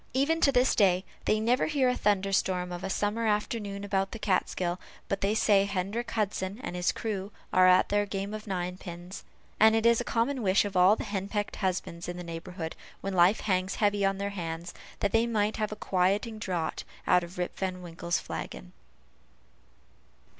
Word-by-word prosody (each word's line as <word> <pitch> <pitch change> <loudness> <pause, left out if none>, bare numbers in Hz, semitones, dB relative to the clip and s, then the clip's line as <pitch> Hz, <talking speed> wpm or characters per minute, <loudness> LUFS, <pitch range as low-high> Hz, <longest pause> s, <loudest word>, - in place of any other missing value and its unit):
Even 315 +5 +2
to 280 - +5
this 250 0 +3
day, 190 -2 +3 0.2
they 215 - +2
never 240 +4 +2
hear 285 -4 +2
a 250 - +2
thunder 195 -3 +1
storm 180 -2 0
of 175 +1 -6
a - - -2
summer 210 +4 0
afternoon 210 -1 -1
about 195 -1 -1
the - - -5
Kaatskill, 185 -3 0 0.3
but 195 - -2
they 200 +2 +1
say 200 -3 +4
Hendrick 200 +4 -2
Hudson 205 -1 -2
and 180 - -4
his 180 0 +1
crew 205 -3 -4 0.2
are 185 0 +6
at 185 0 +5
their 205 0 +1
game 195 +1 -4
of 215 0 -7
ninepins; 180 -1 -5 0.4
and 220 +1 +7
it 225 0 +1
is 235 0 +5
a - - -2
common 245 +3 0
wish 195 -1 +3
of 200 -2 -5
all 185 +4 +6
henpecked 205 0 -3
husbands 180 -3 -2
in 175 - -5
the 180 - -6
neighborhood, 165 0 -6 0.3
when 195 0 -3
life 180 +3 +4
hangs 185 -1 0
heavy 205 -1 +1
on 195 0 +2
their 200 +1 -2
hands, 170 -2 -5 0.3
that 200 - +1
they 225 +2 +3
might 215 -2 0
have 215 -1 -1
a - - -4
quieting 205 +3 0
draught 175 -6 -2 0.2
out 180 -1 +4
of 175 +2 -9
Rip 180 0 -3
Van 185 -1 -3
Winkle's 170 0 -2
flagon. - - -7
195 Hz, 190 wpm, -29 LUFS, 180-215 Hz, 0.4 s, and